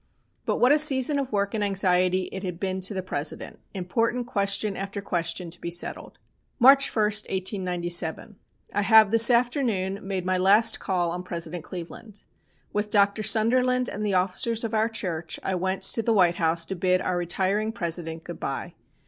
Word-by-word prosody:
But - - 0
what 250 - +4
a 300 - +5
season 285 -1 +3
of 270 -2 -4
work 200 -1 -1
and 215 -2 -1
anxiety 185 -2 +1
it 190 - -6
had 180 -3 -5
been 190 -1 -2
to 190 +3 0
the 190 - -3
President, 150 -4 -3 0.2
important 230 +7 -1
question 200 -2 -1
after 195 +1 -5
question 175 -2 -3
to 175 - -10
be 170 - -4
settled. 170 0 -4 0.4
"March 275 +2 +6
1, 215 - 0
1897. 185 -3 -1 0.4
I 205 - +1
have 220 0 +6
this 230 +1 +5
afternoon 235 -6 0
made 190 -2 -4
my 185 0 0
last 200 +4 +4
call 175 -4 -1
on 180 +1 -4
President 170 -2 -5
Cleveland. 190 +5 -10 0.5
With 210 0 -1
Dr. 200 0 +2
Sunderland 250 +4 +2
and 210 - -5
the 205 -2 0
officers 200 +5 0
of 225 -1 -4
our 220 +1 +1
church 175 -7 -5
I 190 - -2
went 190 +1 -2
to 225 - +1
the 225 +1 +1
White 175 -4 +3
House 165 0 +1
to 190 - -5
bid 185 +1 +1
our 185 - -2
retiring 190 +5 -1
President 165 -5 -3
goodbye. - - -6
195 Hz, 175 wpm, -25 LUFS, 180-220 Hz, 0.5 s, March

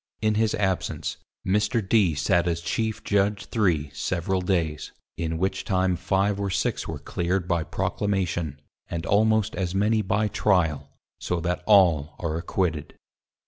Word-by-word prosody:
In 110 0 +2
his 110 0 +1
absence 95 -3 -1 0.3
_Mr. 105 +2 +1
D 100 -6 +4
_ - - -8
sate 85 +4 +2
as 85 -1 -1
Chief 110 +5 -2
Judge 100 0 +1
3 85 -10 0
several 90 +5 -1
days, 85 -5 -1 0.2
in 80 -1 -2
which 95 +2 -1
time 95 -1 +1
5 95 +3 0
or 100 -1 -1
6 100 +5 -1
were 80 - -4
clear'd 90 +4 -2
by 85 -2 +1
Proclamation, 85 -6 -2 0.3
and 85 -1 -4
almost 110 +1 +2
as 95 -1 -2
many 105 +2 +2
by 105 +2 +1
Trial; 80 -9 +1 0.3
so 90 - -2
that 90 +1 -1
all 85 -8 +4
are 80 -3 -3
acquitted. 85 -2 -2
95 Hz, 150 wpm, -25 LUFS, 85-100 Hz, 0.3 s, D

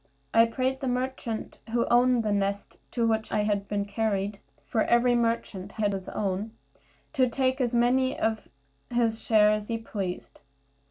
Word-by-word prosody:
I 230 0 +7
prayed 260 +3 -1
the 265 - -3
merchant 250 -3 -3
who 235 +1 +1
owned 245 0 +4
the 215 - 0
nest 200 0 -1
to 235 -2 0
which 220 -1 0
I 210 - +1
had 205 -1 -1
been 205 -1 -1
carried 205 -1 -1 0.3
(for 220 - 0
every 240 +1 +4
merchant 230 -5 -1
had 205 -2 0
his 190 -1 -5
own), 200 +2 -2 0.6
to 260 -4 +3
take 260 +2 0
as 240 -1 0
many 255 +2 +2
for 220 0 0 0.5
his 230 -2 0
share 210 -2 +5
as 215 0 -1
he 230 - -1
pleased. 200 -5 -5
225 Hz, 165 wpm, -27 LUFS, 205-245 Hz, 0.6 s, I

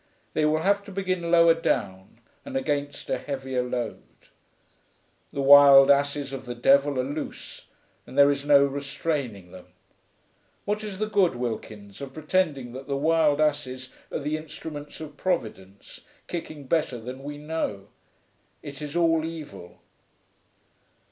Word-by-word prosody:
They 155 - +1
will 155 +1 +1
have 200 +1 +2
to - - -10
begin 185 -3 -2
lower 170 -1 +6
down 105 -11 -3 0.2
and 275 -1 -4
against 145 - -3
a 130 - -1
heavier 130 -2 -3
load.... 125 -2 -4 1.3
The 140 - -3
Wild 140 0 +9
Asses 140 0 +1
of 130 -1 -6
the 120 - -5
Devil 140 +3 +3
are - - +1
loose, 145 +3 -7 0.4
and 130 - -10
there 140 0 +7
is 140 0 -3
no 140 -1 +6
restraining 140 - -4
them. 95 -1 -13 1.0
What 210 +1 -2
is 205 -3 -6
the 215 - -1
good, 195 -8 +2
Wilkins, 110 -3 -6
of 135 -1 -8
pretending 155 -5 -1
that 130 +1 -9
the 140 -1 -1
Wild 155 0 +2
Asses 140 -4 -1 0.2
are - - -2
the 150 +1 -2
instruments 150 -1 -9
of 150 -2 -9
Providence, 105 - -4 0.2
kicking 155 -4 -6
better 150 -2 0
than 125 +4 -8
we 145 +1 -6
know? 145 -10 -4 0.7
It 140 0 -9
is 150 +1 -6
all 165 -2 +3
evil.' 155 - -8
145 Hz, 145 wpm, -26 LUFS, 130-160 Hz, 1.3 s, Wild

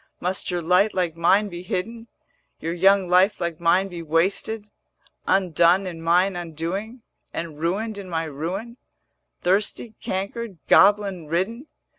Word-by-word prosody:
Must 185 +2 -2
your 175 -2 -2
light 180 +5 +3
like 175 -3 0
mine 195 +5 +3
be 175 -3 -7
hidden, 225 +6 -4 0.5
480 - - -10
Your 165 - -1
young 190 +2 +4
life 185 +4 +4
like 170 -3 -3
mine 180 +3 +3
be 175 -3 -7
wasted, 185 +7 0 0.6
Undone 180 0 +3
in 170 -3 -6
mine 180 +4 +2
undoing, 175 - -5 0.3
And 165 -3 -6
ruined 200 +6 -2
in 190 -2 -9
my 165 -1 -1
ruin, 175 - -5 0.6
Thirsty, 205 +4 0
cankered, 200 +2 -4
goblin 200 -5 +4
ridden?' 205 - -2
185 Hz, 140 wpm, -23 LUFS, 170-200 Hz, 0.6 s, young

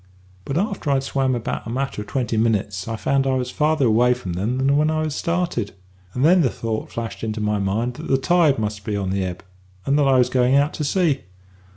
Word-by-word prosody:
"But 135 - -2
after 195 -5 -2
I'd 135 -1 +2
swam 135 -1 0
about 120 -1 -4
a - - -5
matter 130 -2 -2
of 105 - -9
twenty 125 -3 -2
minutes 105 -3 0
I 115 - -2
found 135 +4 0
I 130 - +2
was 125 -1 -2
farther 155 -2 +1
away 120 +2 +4
from 95 -9 -6
'em 110 +8 -1
than 135 +1 +2
I - - +3
was - - +3
when 155 +1 +2
I 155 0 0
started; 170 - -2 0.4
and 125 +3 +2
then 180 +2 +6
the 135 - +3
thought 110 -2 -4
flashed 115 -1 -6
into 110 -1 -3
my 105 -1 0
mind 105 +5 -1
that - - -7
the 135 - +3
tide 155 +1 +3
must 105 -1 -3
be 105 0 -2
on 95 -2 -2
the 95 0 0
ebb, 90 -1 -5 0.4
and 140 +2 +2
that 140 - +3
I 135 -1 +4
was 125 - +3
going 125 +1 +3
out 145 +1 +3
to 155 - -3
sea. 155 -2 +1
125 Hz, 245 wpm, -22 LUFS, 110-140 Hz, 0.4 s, then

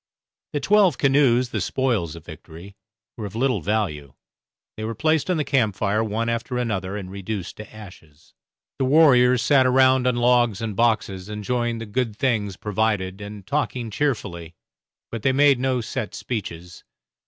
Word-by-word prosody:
The 145 - 0
twelve 195 -1 +3
canoes, 135 -3 +3
the - - -3
spoils 115 - -1
of 85 -1 -12
victory, 85 +4 -12 0.4
were 110 -3 -4
of 100 - -11
little 125 -4 0
value; 75 -9 -2 0.6
they 110 - -6
were 115 +1 -3
placed 160 +1 +1
on 180 - +1
the 150 - 0
camp 120 -9 +1
fire 105 +3 0
one 110 +1 -2
after 115 +2 -2
another, 100 -5 -2
and 95 -2 -7
reduced 100 -1 -5
to 110 - -10
ashes. 80 -7 -15 0.5
The 135 - +1
warriors 125 -4 +5
sat 135 -3 +4
around 130 0 +4
on 125 - +2
logs 120 -3 +2
and 110 -3 -4
boxes 105 -4 0
enjoying 120 +3 -2
the 115 - -6
good 115 0 -2
things 105 -6 -1
provided 105 -2 -1
and 100 -1 -9
talking 125 -2 -2
cheerfully, 85 - -3 0.6
but 115 - -5
they 130 +4 +2
made 140 -1 +4
no 130 -1 0
set 115 0 -5
speeches. 90 -7 -6
115 Hz, 165 wpm, -23 LUFS, 100-130 Hz, 0.6 s, warriors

